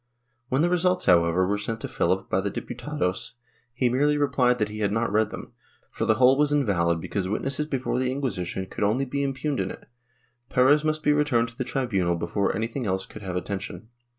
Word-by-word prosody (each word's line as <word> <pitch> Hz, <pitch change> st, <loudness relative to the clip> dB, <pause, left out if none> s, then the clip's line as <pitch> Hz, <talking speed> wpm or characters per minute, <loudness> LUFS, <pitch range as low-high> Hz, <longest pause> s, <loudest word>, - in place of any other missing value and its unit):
When 135 Hz, +4 st, +2 dB
the 175 Hz, -, +3 dB
results, 180 Hz, +1 st, +2 dB
however, 85 Hz, +1 st, +4 dB
were 105 Hz, +2 st, 0 dB
sent 115 Hz, +2 st, -3 dB
to -, -, -3 dB
PhiHp -, -, 0 dB
by -, -, +1 dB
the -, -, -1 dB
Diputados, 90 Hz, +5 st, -3 dB, 0.4 s
he 125 Hz, +1 st, +1 dB
merely 145 Hz, +4 st, +2 dB
replied 130 Hz, -3 st, +2 dB
that 105 Hz, -3 st, 0 dB
he 105 Hz, 0 st, -7 dB
had 100 Hz, -2 st, +1 dB
not 115 Hz, 0 st, 0 dB
read 105 Hz, 0 st, +2 dB
them, -, -, -9 dB, 0.4 s
for -, -, -2 dB
the 110 Hz, -, +3 dB
whole 130 Hz, +3 st, +5 dB
was 150 Hz, 0 st, +3 dB
invalid 90 Hz, -, +2 dB
because 95 Hz, +3 st, -3 dB
witnesses 135 Hz, +8 st, -1 dB
before 130 Hz, -3 st, -1 dB
the 130 Hz, 0 st, 0 dB
Inquisition 95 Hz, -9 st, -3 dB
could 95 Hz, -, -5 dB
only 115 Hz, +7 st, +2 dB
be 140 Hz, +2 st, -2 dB
impugned 140 Hz, +1 st, -2 dB
in -, -, -1 dB
it; -, -, -10 dB, 0.6 s
Perez 140 Hz, +4 st, +4 dB
must 155 Hz, 0 st, -1 dB
be 150 Hz, -, +4 dB
returned 130 Hz, -6 st, +2 dB
to 115 Hz, -, -16 dB
the 130 Hz, -, -2 dB
tribunal 100 Hz, -11 st, 0 dB
before 85 Hz, +4 st, -1 dB
anything 115 Hz, +3 st, -3 dB
else 95 Hz, 0 st, -1 dB
could 110 Hz, -, -11 dB
have 95 Hz, -3 st, -5 dB
atten 100 Hz, +1 st, -3 dB
tion. 105 Hz, +3 st, -8 dB
120 Hz, 210 wpm, -25 LUFS, 100-140 Hz, 0.6 s, whole